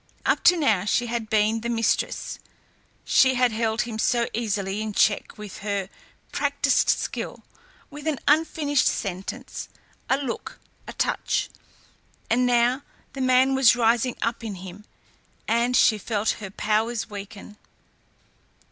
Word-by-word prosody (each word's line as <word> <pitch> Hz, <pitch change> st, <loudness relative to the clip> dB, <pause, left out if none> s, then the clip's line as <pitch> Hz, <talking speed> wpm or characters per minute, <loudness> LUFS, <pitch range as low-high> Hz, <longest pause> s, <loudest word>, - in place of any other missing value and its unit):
Up -, -, +1 dB
to 350 Hz, +1 st, +7 dB
now 220 Hz, -, +2 dB
she 225 Hz, +3 st, +1 dB
had 235 Hz, -2 st, -3 dB
been 220 Hz, +1 st, +2 dB
the 235 Hz, -, -3 dB
mistress, 230 Hz, -1 st, -1 dB, 0.7 s
she 260 Hz, -1 st, +4 dB
had 250 Hz, -1 st, +3 dB
held 220 Hz, 0 st, 0 dB
him 225 Hz, -2 st, -5 dB
so 235 Hz, +1 st, +2 dB
easily 205 Hz, -3 st, -2 dB
in 215 Hz, -1 st, -4 dB
check 215 Hz, 0 st, +1 dB
with 210 Hz, -2 st, -9 dB
her 200 Hz, -2 st, -3 dB, 0.4 s
practised -, -, +1 dB
skill, -, -, -2 dB, 0.5 s
with 295 Hz, +1 st, -8 dB
an 305 Hz, -3 st, 0 dB
unfinished 295 Hz, -1 st, +2 dB
sentence, 190 Hz, -1 st, -4 dB, 0.4 s
a 265 Hz, -, +3 dB
look, 275 Hz, -4 st, -5 dB, 0.3 s
a -, -, -7 dB
touch. -, -, -1 dB, 0.8 s
And 250 Hz, +2 st, +3 dB
now 245 Hz, +2 st, +2 dB, 0.3 s
the 275 Hz, -, -5 dB
man 255 Hz, +1 st, +4 dB
was 265 Hz, -3 st, +5 dB
rising 240 Hz, +1 st, +2 dB
up 230 Hz, 0 st, -2 dB
in 215 Hz, -3 st, -5 dB
him, 190 Hz, +3 st, -10 dB, 0.6 s
and 235 Hz, +2 st, +2 dB
she 215 Hz, -2 st, +4 dB
felt 210 Hz, +1 st, 0 dB
her 195 Hz, -, -6 dB
powers 220 Hz, +3 st, -1 dB
weaken. 205 Hz, 0 st, -9 dB
230 Hz, 140 wpm, -24 LUFS, 210-250 Hz, 0.8 s, to